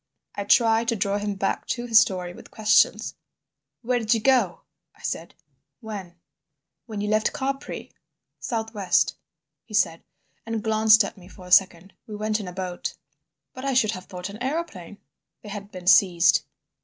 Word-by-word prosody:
I 200 Hz, -, -4 dB
tried 225 Hz, +1 st, +4 dB
to 230 Hz, -, +1 dB
draw 200 Hz, 0 st, 0 dB
him 205 Hz, 0 st, -3 dB
back 195 Hz, 0 st, -2 dB
to 240 Hz, -1 st, -2 dB
his 225 Hz, -2 st, +7 dB
story 180 Hz, -3 st, 0 dB
with -, -, -14 dB
questions. 215 Hz, -1 st, +2 dB, 0.7 s
"Where 245 Hz, +1 st, +1 dB
did 225 Hz, 0 st, +2 dB
you -, -, 0 dB
go?" 235 Hz, -6 st, +2 dB, 0.3 s
I -, -, -21 dB
said. -, -, -4 dB, 0.4 s
"When?" 200 Hz, -6 st, -8 dB, 0.7 s
"When 215 Hz, -3 st, -5 dB
you 210 Hz, -, -2 dB
left 215 Hz, +1 st, +1 dB
Capri." 275 Hz, +1 st, -4 dB, 0.5 s
"South 225 Hz, -2 st, -3 dB
west," 195 Hz, -5 st, +2 dB, 0.5 s
he 215 Hz, -, -8 dB
said, 165 Hz, -5 st, +2 dB, 0.4 s
and 225 Hz, -1 st, -4 dB
glanced 220 Hz, 0 st, +5 dB
at 200 Hz, -, -6 dB
me 180 Hz, -, -15 dB
for 185 Hz, -1 st, -14 dB
a 180 Hz, -, -12 dB
second. 185 Hz, 0 st, +4 dB
"We 215 Hz, -, -7 dB
went 215 Hz, +1 st, -1 dB
in 200 Hz, -, -6 dB
a -, -, -5 dB
boat." 180 Hz, -1 st, -5 dB, 0.6 s
"But 255 Hz, -, -9 dB
I 275 Hz, -1 st, -1 dB
should 220 Hz, -4 st, +3 dB
have 185 Hz, -3 st, -7 dB
thought 180 Hz, 0 st, -7 dB
an 210 Hz, +3 st, -10 dB
aeroplane?" 255 Hz, -, -4 dB, 0.5 s
"They 210 Hz, -, -9 dB
had 200 Hz, 0 st, -7 dB
been 185 Hz, -2 st, -9 dB
seized." 180 Hz, -1 st, +5 dB
210 Hz, 175 wpm, -25 LUFS, 185-225 Hz, 0.7 s, his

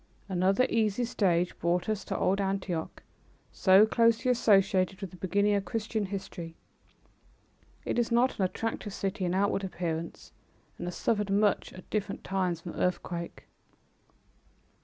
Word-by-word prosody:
Another 190 Hz, +5 st, +2 dB
easy 220 Hz, +1 st, +1 dB
stage 180 Hz, -6 st, +1 dB
brought 175 Hz, +1 st, 0 dB
us 215 Hz, -2 st, -1 dB
to -, -, -3 dB
old 195 Hz, +2 st, +1 dB
Antioch, 190 Hz, -4 st, -3 dB, 0.5 s
so 190 Hz, +2 st, +6 dB
closely 230 Hz, +3 st, +3 dB
associated 195 Hz, -5 st, +3 dB
with 195 Hz, -3 st, -6 dB
the -, -, -12 dB
beginning 200 Hz, +4 st, +1 dB
of 200 Hz, -1 st, +1 dB
Christian 215 Hz, +1 st, -2 dB
history. 185 Hz, -4 st, -6 dB, 1.3 s
It -, -, 0 dB
is 240 Hz, 0 st, 0 dB
not 240 Hz, +1 st, +2 dB
an -, -, +2 dB
attractive 210 Hz, +1 st, -4 dB
city 195 Hz, 0 st, -2 dB
in 175 Hz, +1 st, 0 dB
outward 200 Hz, 0 st, +1 dB
appearance 170 Hz, -3 st, -4 dB, 0.5 s
and 175 Hz, -, -4 dB
has 180 Hz, -, -4 dB
suffered 210 Hz, -3 st, 0 dB
much 200 Hz, 0 st, +2 dB
at 185 Hz, -, -12 dB
different 205 Hz, -2 st, -2 dB
times 185 Hz, -3 st, -1 dB
from 170 Hz, -, -7 dB
earthquake. 175 Hz, -1 st, -3 dB
195 Hz, 140 wpm, -29 LUFS, 180-210 Hz, 1.3 s, so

